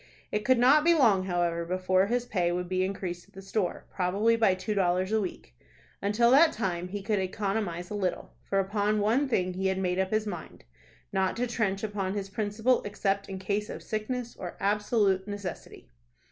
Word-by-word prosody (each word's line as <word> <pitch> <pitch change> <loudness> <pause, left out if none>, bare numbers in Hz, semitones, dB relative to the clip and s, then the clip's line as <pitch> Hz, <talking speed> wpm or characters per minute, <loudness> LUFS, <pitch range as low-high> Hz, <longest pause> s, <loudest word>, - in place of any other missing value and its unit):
It 210 0 -1
could 255 +2 +4
not 270 +5 +6
be 340 +1 +5
long, 205 -11 +4
however, 175 -2 0
before 185 +2 +1
his 245 +2 0
pay 180 -7 0
would 180 0 -2
be 185 +1 0
increased 185 -2 -4
at - - -26
the 195 - -8
store, 195 -1 -2
probably 200 +5 +2
by 220 -5 +3
two 185 +3 -3
dollars 185 0 +1
a 220 0 +2
week. 175 - -6 0.5
Until 215 +4 +3
that 315 +4 +6
time 180 -5 -2
he 200 +1 -5
could 210 0 0
economize 190 -2 -2
a - - -3
little; 195 -3 -2
for 195 - -2
upon 205 +2 +1
one 235 +7 +2
thing 185 -6 0
he 190 +1 -1
had 190 0 0
made 185 -1 0
up 190 0 +1
his 215 +1 0
mind, 210 - -7 0.5
not 190 +1 +1
to 245 - +1
trench 210 -5 -1
upon 200 -2 -2
his 195 -1 -4
principal 220 +4 +1
except 200 -1 -2
in 190 - -5
case 205 +2 -2
of - - -7
sickness 235 +2 -3
or 175 -2 -7
absolute 205 -1 +1
necessity. 205 -4 -7
200 Hz, 195 wpm, -28 LUFS, 185-215 Hz, 0.5 s, not